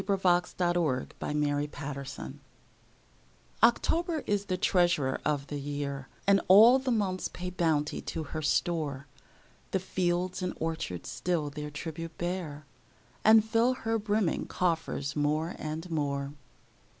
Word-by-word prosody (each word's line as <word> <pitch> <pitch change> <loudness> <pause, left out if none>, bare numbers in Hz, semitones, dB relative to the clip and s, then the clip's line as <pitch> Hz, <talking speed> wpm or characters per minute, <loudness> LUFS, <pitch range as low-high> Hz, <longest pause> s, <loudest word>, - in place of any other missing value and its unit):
Paul 195 -1 0 0.4
Laurence 175 -7 +1
Dunbar 145 -1 0 0.2
October 140 -1 -6 1.2
OCTOBER 320 +7 +3
is 205 -1 0
the 185 -2 -1
treasurer 175 -8 +2
of 145 -2 0
the 145 0 -5
year, 140 -1 -4 0.2
And 200 0 +5
all 225 +7 +8
the 265 0 -3
months 200 -6 0
pay 180 0 -6
bounty 160 -4 0
to 160 - -4
her 155 +1 -5
store: 150 -3 0 0.6
The 190 - 0
fields 180 0 -1
and 180 0 -2
orchards 160 - -3
still 165 -5 -1
their 150 +1 -5
tribute 160 +2 -6
bear, 170 -4 -4 0.6
And 220 0 +7
fill 230 +3 +2
her 225 -2 -1
brimming 205 -4 0
coffers 165 -5 -1
more 155 +3 0
and 155 +3 -4
more. 140 -2 -1
165 Hz, 125 wpm, -29 LUFS, 145-190 Hz, 1.2 s, all